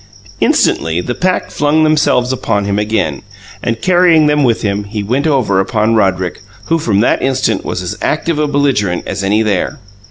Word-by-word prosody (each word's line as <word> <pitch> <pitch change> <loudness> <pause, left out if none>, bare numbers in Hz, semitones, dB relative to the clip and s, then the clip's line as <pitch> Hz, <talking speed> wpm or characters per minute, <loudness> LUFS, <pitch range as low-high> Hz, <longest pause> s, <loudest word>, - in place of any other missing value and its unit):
Instantly, 80 +1 +1
the 105 +7 -3
pack 185 +7 -1
flung 150 +2 +1
themselves 145 -5 +2
upon 105 -5 -1
him 100 0 -1
again, 105 -9 -1 0.4
and, 115 -1 -3
carrying 175 -4 +4
them 150 0 +2
with 120 -3 +1
him, 100 0 -1
he 105 0 -5
went 130 +9 0
over 125 -10 +1
upon 110 +3 0
Roderick, 95 -4 0 0.2
who 165 0 0
from 105 -8 +1
that 120 - +1
instant 130 0 0
was 90 - -4
as 90 - -4
active 155 +1 -1
a 150 - +1
belligerent 135 -11 0
as 100 0 -4
any 105 +3 +2
there. 100 -4 -1
115 Hz, 180 wpm, -14 LUFS, 100-145 Hz, 0.4 s, carrying